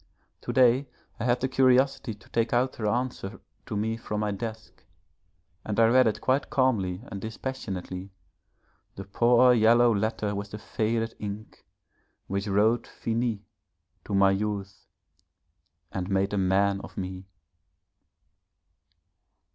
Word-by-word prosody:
To - - -4
day 130 +2 +4 0.3
I 115 - -2
had 120 0 +2
the 130 - +1
curiosity 130 -2 +2
to 100 - -21
take 115 0 0
out 125 +2 +1
her 110 - -2
answer 120 -3 -2 0.3
to 105 - -3
me 110 +2 -1
from 105 -2 -4
my 105 -1 0
desk, 110 +2 -7 0.8
and 105 0 -2
I 115 - +7
read 130 0 +5
it 110 - -1
quite 130 +2 +1
calmly 115 -9 +1
and 100 - -6
dispassionately, 100 -5 -5 0.9
the 95 - -6
poor 120 +5 +4
yellow 120 +1 +5
letter 105 0 -1
with 100 0 -5
the 105 - -7
faded 115 +1 -2
ink, 105 +1 -8 0.6
which 100 +2 -3
wrote 110 +4 +2
'Finis' 115 -2 -2 0.6
to 100 - -2
my 100 0 +5
youth 100 -1 -3 1.0
and 95 0 -4
made 95 +1 +1
a - - 0
man 95 +1 +2
of - - -11
me. 95 0 -5
110 Hz, 135 wpm, -27 LUFS, 100-120 Hz, 1.0 s, I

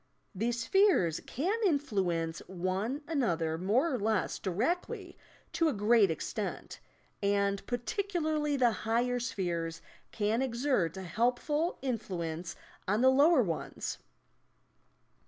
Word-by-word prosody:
These 230 +4 -1
spheres 360 - +3
can 375 - -1
influence 195 - 0
one 190 - -2
another 170 - 0
more 245 - +2
or 255 - -1
less 220 +1 0
directly 230 - -2 0.4
to 330 -1 +3
a - - -1
great 210 -1 +4
extent, 160 - -4 0.4
and 200 0 +1
particularly 310 - -1
the 245 -3 +4
higher 240 +3 0
spheres 170 -7 -2 0.3
can 215 +3 0
exert 235 - 0
a 190 - -5
helpful 250 - 0
in 250 -4 0
fluence 170 -4 -5 0.3
on 205 +4 +2
the 260 +1 +6
lower 285 +1 +5
ones. 165 -6 -4
230 Hz, 115 wpm, -31 LUFS, 185-280 Hz, 0.4 s, the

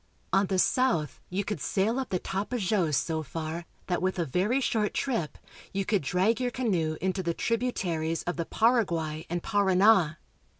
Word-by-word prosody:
On 195 0 +4
the 190 - 0
south 185 - +2
you 190 +3 -1
could 210 +1 -4
sail 215 +6 +1
up 265 - -3
the 185 - 0
Tapajos 195 - 0
so 160 +2 0
far 160 +3 -5 0.2
that, 180 -2 -1
with 185 0 0
a 170 - 0
very 190 - +1
short 220 -5 0
trip, 225 - -1 0.4
you 195 0 -1
could 205 -1 +1
drag 185 - +1
your 250 - +1
canoe 185 -11 -1
into 190 0 0
the 170 -2 -2
tributaries 180 -9 -1
of 175 - -2
the 170 - -2
Paraguay 170 -11 +1
and 175 0 -2
Parana. 190 -4 +4
190 Hz, 170 wpm, -28 LUFS, 165-220 Hz, 0.4 s, On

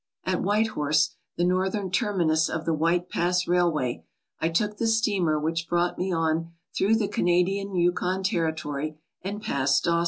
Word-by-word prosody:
At 185 -1 -1
White 210 +3 +2
Horse, 155 -3 +1 0.2
the 175 - +1
northern 190 +1 0
terminus 175 -7 +1
of 160 0 -3
the 165 - +1
White 170 +3 +1
Pass 180 +1 0
Railway, 170 -8 +1 0.4
I 165 - +1
took 210 +5 0
the 230 - 0
steamer 200 -8 +2
which 165 +2 -2
brought 175 0 0
me 185 +1 -1
on 165 0 0 0.2
through 210 +3 +3
the 220 -2 +1
Canadian 195 +1 +1
Yukon 180 +2 +1
Territory 155 -5 -2 0.2
and 205 +2 -5
past 135 -5 +1
Dawson. 170 0 +2
175 Hz, 160 wpm, -26 LUFS, 160-190 Hz, 0.4 s, through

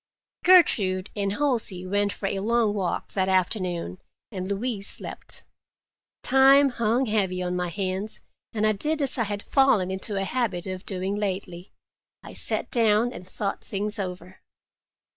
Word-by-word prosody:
Gertrude 205 - +4
and 200 -1 -1
Halsey 225 -9 +1
went 205 +2 0
for 200 - -6
a 195 0 -1
long 225 +1 +1
walk 190 -4 -3
that 190 -1 +1
afternoon, 180 - 0 0.3
and 185 -3 -4
Louise 205 0 -1
slept. - - -6 0.8
Time 270 +2 +6
hung 235 +1 +1
heavy 200 -5 0
on 180 0 -2
my 180 -1 -1
hands, 190 +3 -3 0.3
and 215 -1 0
I 215 - +4
did 300 +10 -1
as 270 -2 -1
I 230 - +2
had 205 0 -4
fallen 235 -10 +3
into 190 +2 -4
a 195 - 0
habit 195 -4 -1
of 185 0 -6
doing 190 +1 -2
lately—I 185 -3 -7
sat - - -1
down 230 +1 +3
and 180 - -10
thought 200 +1 -4
things 210 +1 -3
over. 185 -1 -6
200 Hz, 150 wpm, -25 LUFS, 185-230 Hz, 0.8 s, Time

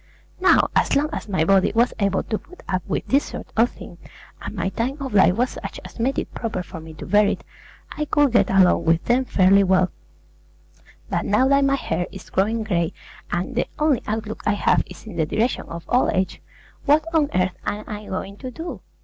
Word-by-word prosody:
Now, 370 - +4
as - - +3
long 295 +3 +1
as - - -5
my 160 -5 +1
body 195 +1 +4
was 235 +2 +3
able 200 -2 +1
to 215 - -3
put 360 - -17
up 185 -1 0
with - - -2
this 275 +2 +3
sort - - -8
of 230 +2 +4
thing, 175 - -12 0.4
and - - -6
my 190 0 -1
time 245 +7 -2
of 270 -4 -5
life 185 -3 +5
was 245 +3 +1
such - - -7
as - - -11
made 260 +4 0
it - - -3
proper 220 -6 -3
for 175 -1 -9
me 160 0 -11
to - - -8
bear 205 +2 +4
it, - - -2 0.5
I 300 - -2
could 290 -2 +3
get 205 -5 +3
along 190 -2 +4
with 165 +1 +2
them 250 +2 +2
fairly 195 -2 +4
well; 185 -1 +3 1.2
but - - 0
now 210 +6 +3
that 275 0 +4
my 275 0 +3
hair 175 -9 -2
is 190 -1 -11
growing 220 +4 +1
gray, 170 -6 0 0.4
and 180 +9 -2
the 250 - 0
only 300 -5 +2
outlook 215 0 -3
I 210 - +2
have 205 - +2
is - - -13
in 210 -6 -8
the 160 - +2
direction 230 +9 0
of 170 0 -8
old 250 - +2
age, 190 0 -1 0.4
what 300 +1 +4
on 305 -3 +3
earth 185 0 +1
am 210 +1 -2
I 210 0 -6
going 195 +1 -5
to 255 - -6
do? 325 +7 -7
210 Hz, 215 wpm, -22 LUFS, 185-255 Hz, 1.2 s, life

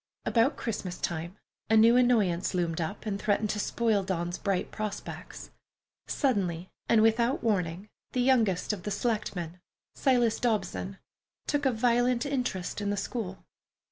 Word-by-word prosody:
About 235 +5 +3
Christmas 195 -6 -4
time, 170 +3 -3 0.3
a 220 - +5
new 230 +2 +7
annoyance 210 -8 +3
loomed 170 -2 0
up 180 +8 -4
and 200 -2 -2
threatened 210 0 +1
to 210 - -3
spoil 220 -1 +1
Dawn's 175 -2 -2
bright 195 -3 -1
prospects. 215 -2 -6 0.6
Suddenly, 185 - 0 0.2
without 230 +4 +3
warning, 185 -3 0 0.3
the 250 - +1
youngest 225 -7 +2
of 200 - -5
the 210 - -4
selectmen, 200 -5 -2 0.3
Silas 245 -5 +2
Dobson, 195 -4 -1 0.5
took 290 -2 +1
a - - +3
violent 245 +2 +2
interest 245 -10 -2
in 205 - -1
the 205 - -1
school. 200 -3 -4
210 Hz, 140 wpm, -29 LUFS, 185-235 Hz, 0.6 s, new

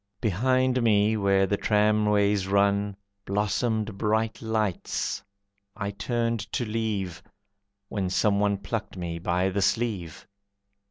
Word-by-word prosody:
Behind 130 +5 +2
me, 110 -1 +3
where 100 -2 +3
the 100 +1 0
tramways 105 -2 +2
run, 100 0 +2 0.3
Blossomed 105 +1 -1
bright 110 +1 0
lights, 110 -4 -1 0.5
I 100 -2 -3
turned 115 +2 -1
to 125 - 0
leave, 105 -5 -2 0.7
When 100 -3 -2
someone 100 +1 +2
plucked 100 +1 -5
me 85 -2 -4
by 90 +2 +1
the 100 +1 -1
sleeve. 95 -7 -1
105 Hz, 110 wpm, -26 LUFS, 100-110 Hz, 0.7 s, me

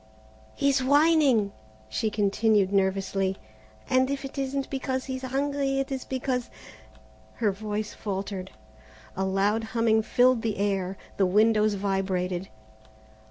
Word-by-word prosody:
"He's 275 -2 +2
whining," 285 -7 +4 0.4
she 110 - -1
continued 205 -1 +2
nervously, 195 0 0 0.5
"and 260 +1 +3
if 280 0 -3
it 270 - -8
isn't 275 0 -2
because 260 -1 -2
he's 260 -1 -4
hungry 275 +1 -1
it 270 0 -2
is 265 -1 -3
because 255 -1 -2 0.4
" - - -27
Her 215 -3 +1
voice 210 +1 -4
faltered. 195 -2 -4 0.7
A 190 - -1
loud 200 +4 +1
humming 225 -1 +2
filled 250 +2 +3
the 220 -2 -2
air, 195 -2 -1 0.2
the 195 - +3
windows 215 +2 +3
vibrated. 190 -2 -1
220 Hz, 125 wpm, -27 LUFS, 195-260 Hz, 0.7 s, whining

